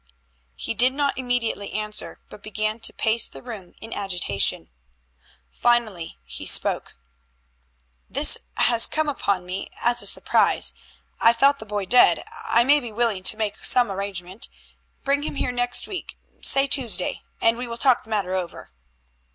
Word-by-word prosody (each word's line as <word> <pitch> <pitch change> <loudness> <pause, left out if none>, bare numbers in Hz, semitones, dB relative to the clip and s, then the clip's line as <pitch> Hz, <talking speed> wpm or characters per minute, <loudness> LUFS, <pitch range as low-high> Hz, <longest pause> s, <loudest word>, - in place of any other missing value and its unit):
He - - -4
did 250 +3 +3
not 285 0 -1
immediately 245 -5 -2
answer, 210 0 -2
but - - -14
began 215 +1 -3
to - - +3
pace 225 +1 0
the - - -12
room 215 -8 -10
in 225 +1 -8
agitation. 180 - 0 0.8
Finally 225 -8 -1
he 60 0 -6
spoke. - - -1 1.1
"This - - +5 0.2
has 235 -1 +4
come 310 -1 -1
upon 200 -10 -2
me 185 +2 -5
as 240 0 +2
a - - 0
surprise. - - +2 0.5
I 230 - +5
thought 275 +4 +3
the 220 - -10
boy 205 -1 -3
dead. 245 +6 +4 0.2
I 235 - +3
may 290 +4 +4
be 240 -5 -8
willing 220 -3 -1
to 215 - +3
make 215 -2 -4
some 245 -5 +6
arrangement. 190 0 -5 0.5
Bring 280 +1 0
him 295 - -4
here 250 - -1
next 245 0 0
week 380 - -7 0.2
say 275 0 +4
Tuesday 250 -9 -1 0.2
and 230 0 +3
we 245 +1 -6
will 235 0 -7
talk 255 +1 +2
the - - -19
matter 200 -4 -2
over." 180 - -5
230 Hz, 160 wpm, -22 LUFS, 200-245 Hz, 1.1 s, some